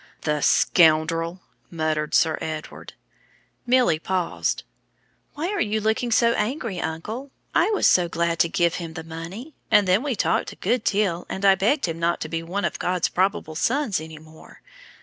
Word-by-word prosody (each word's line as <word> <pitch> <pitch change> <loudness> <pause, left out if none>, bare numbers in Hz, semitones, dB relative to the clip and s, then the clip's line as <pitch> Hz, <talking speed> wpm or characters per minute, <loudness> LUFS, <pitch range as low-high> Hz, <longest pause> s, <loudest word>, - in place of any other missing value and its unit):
"The 150 -1 -1
scoundrel!" 165 +5 +3 0.3
muttered 155 -2 -1
Sir 160 -2 +3
Edward. 155 -1 -6 0.7
Milly 245 -10 +3
paused. 185 +1 -2 0.7
"Why 320 +5 -2
are 410 - -1
you 215 0 0
looking 220 +3 0
so 235 +1 +4
angry, 220 - -2
uncle? 215 - -5 0.2
I - - +3
was 425 - +1
so 175 -2 +4
glad 170 0 -1
to 170 - +3
give 170 0 +1
him 165 -1 -7
the 160 - -6
money; 165 - -8 0.2
and 210 -3 +4
then 185 +4 +3
we 275 -3 -2
talked - - 0
a - - -16
good 245 -2 -1
deal, 195 -4 0
and 190 +1 -3
I 195 - +7
begged 215 +10 +1
him 165 -1 -4
not 170 +1 0
to - - -4
be 165 -1 -2
one 185 +5 -3
of - - -3
God's 180 -1 0
probable 185 -4 0
sons 225 - 0
any 160 0 -9
more. 155 +1 -16
180 Hz, 175 wpm, -23 LUFS, 160-220 Hz, 0.7 s, I